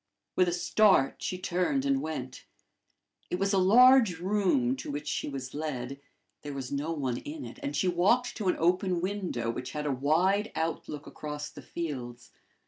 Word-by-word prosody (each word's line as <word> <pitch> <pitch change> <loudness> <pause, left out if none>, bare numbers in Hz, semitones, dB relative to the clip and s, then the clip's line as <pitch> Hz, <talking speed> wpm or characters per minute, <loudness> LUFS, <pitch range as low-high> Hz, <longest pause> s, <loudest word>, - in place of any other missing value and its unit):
With 185 - +4
a - - +1
start, 175 -3 +3
she 185 - -2
turned 185 +10 0
and 275 -1 +2
went. 130 -5 -6 0.8
It 180 - -1
was 195 +2 0
a 195 - +4
large 230 0 +6
room 210 - +1
to - - -7
which 145 +1 -4
she 145 - -2
was 130 -2 -6
led. 140 -3 -4 0.4
There 145 -1 -6
was 130 -2 -5
no 145 +3 -2
one 135 -6 -2
in 295 - -7
it, - - -10
and 285 0 -3
she 185 - +1
walked 200 +8 +2
to 210 -5 -2
an 180 - +3
open 180 +1 +2
window, 180 - -2
which 125 +2 -6
had 150 0 -3
a 145 - +1
wide 175 +11 +2
outlook 160 -2 -3
across 150 0 -6
the - - -11
fields. 125 -7 -6
170 Hz, 180 wpm, -29 LUFS, 145-200 Hz, 0.8 s, large